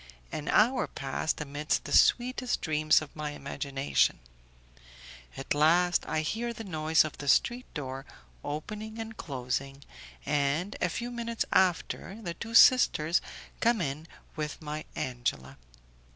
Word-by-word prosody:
An 150 - -5
hour 245 +5 +3
passed 135 +3 -3
amidst 150 +1 -1
the - - -6
sweetest 250 0 +3
dreams 155 -1 +3
of 145 - -13
my 150 -1 -4
imagination; 140 -1 0 1.2
at 135 - -2
last 170 +4 +3
I 155 - 0
hear 235 +9 -2
the 225 - -8
noise 160 -4 +2
of 155 - -7
the 145 - -6
street 240 - +2
door 135 -2 -5 0.4
opening 215 +9 -5
and 225 0 -6
closing, 135 - -4 0.4
and, 145 +7 0
a 180 - +2
few 240 +8 -4
minutes 235 -1 -2
after, 190 +3 +1
the 175 -6 -5
two 230 +6 -7
sisters 180 -10 +6 0.4
come 235 -1 +3
in 155 -1 -3 0.3
with 150 -2 -4
my 155 0 -5
Angela. 95 - -3
155 Hz, 135 wpm, -29 LUFS, 140-220 Hz, 1.2 s, sisters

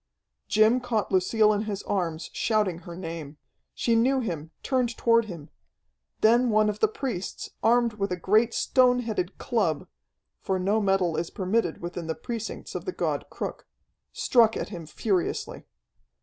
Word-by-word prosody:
Jim 220 +3 +4
caught 240 -4 -1
Lucille 210 +3 +3
in 210 +1 -1
his 205 -2 -4
arms, 170 -5 -2
shouting 210 -6 +1
her 175 -1 -9
name. 165 -4 -7 0.4
She 230 - +1
knew 260 +4 +3
him, 165 -10 -4
turned 250 -3 0
toward 230 -1 +4
him. 170 -8 -9 0.7
Then 235 +3 +5
one 215 -1 +3
of 210 - -10
the 220 - +4
priests, 215 -5 -5
armed 235 0 +3
with 200 -3 -2
a - - +1
great 215 +6 +3
stone 250 -2 +3
headed 205 -6 -3
club 200 - 0 0.5
for 190 - -1
no 200 +4 +1
metal 195 -4 +1
is 170 - -2
permitted 190 -2 -1
within 175 -1 -5
the 160 - -2
precincts 225 - -6
of - - -5
the 370 - -2
god - - -2
Cruk - - -6 0.4
struck 230 -3 +3
at - - -4
him 170 -6 -8
furiously. 185 +2 -2
210 Hz, 160 wpm, -26 LUFS, 180-230 Hz, 0.7 s, Then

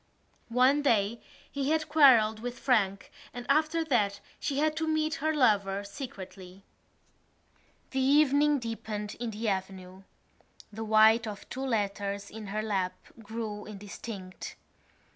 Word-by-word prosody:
One 255 +5 +4
day 230 -4 +1 0.3
he 280 0 -2
had 315 0 +1
quarrelled 250 -8 +5
with 245 +2 -5
Frank 200 -7 +1 0.2
and 245 0 -6
after 310 +3 +2
that 205 -8 +1 0.2
she 275 - -2
had 305 +1 +1
to 320 0 -1
meet 310 0 +1
her 315 +1 +2
lover 205 -8 +2
secretly. 195 -4 -9 1.3
The 265 - -1
evening 290 +1 +4
deepened 220 -3 -5
in 240 -1 -3
the 220 +1 -4
avenue. 190 -1 -4 0.7
The 220 +2 -5
white 220 +1 +5
of 205 -2 -7
two 260 - -5
letters 200 -3 -2
in 215 -1 -8
her 215 +2 -2
lap 195 -4 -1 0.2
grew 220 -1 -6
indistinct. 200 -2 -8
220 Hz, 130 wpm, -29 LUFS, 200-275 Hz, 1.3 s, quarrelled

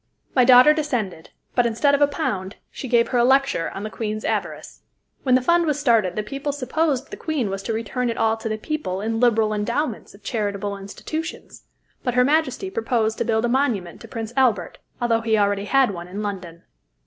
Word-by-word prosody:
My 255 - +5
daughter 255 +4 +8
descended; 245 - -3 0.2
but, 245 -1 +3
instead 235 +5 +2
of 285 - +2
a 290 - +6
pound, 195 -8 -3 0.2
she 265 - -7
gave 235 -1 +3
her 250 - +1
a - - +4
lecture 265 -9 +2
on 195 - -7
the 215 - -4
Queen's 215 +2 -4
avarice. - - -3 0.4
When 255 -2 +3
the 255 - +2
fund 340 +3 +3
was 295 -1 0
started 225 -10 +2
the 215 - -1
people 275 +6 -4
supposed 280 0 -1
the - - -5
Queen 280 -11 -2
was 195 0 -4
to 225 - -4
return 230 +3 -2
it 230 - -3
all 225 0 +2
to 225 - -4
the 215 - -2
people 215 -8 -3
in 225 +2 -2
liberal 225 -3 +3
endowments 235 +3 -2
of 200 - -19
charitable 205 -3 -2
institutions, 310 - -7 0.4
but 250 -2 -2
her 250 - +5
Majesty 315 +6 +1
proposed 225 -5 0
to - - 0
build 220 0 +1
a - - +2
monument 235 -9 -1
to 230 - -10
Prince 225 0 -6
Albert, 230 -10 +1 0.2
although 230 -2 +1
he 225 -1 +1
already 200 -1 +1
had 265 0 +3
one 175 -2 -7
in 200 +4 -5
London. 180 -5 -6
230 Hz, 210 wpm, -22 LUFS, 210-270 Hz, 0.4 s, daughter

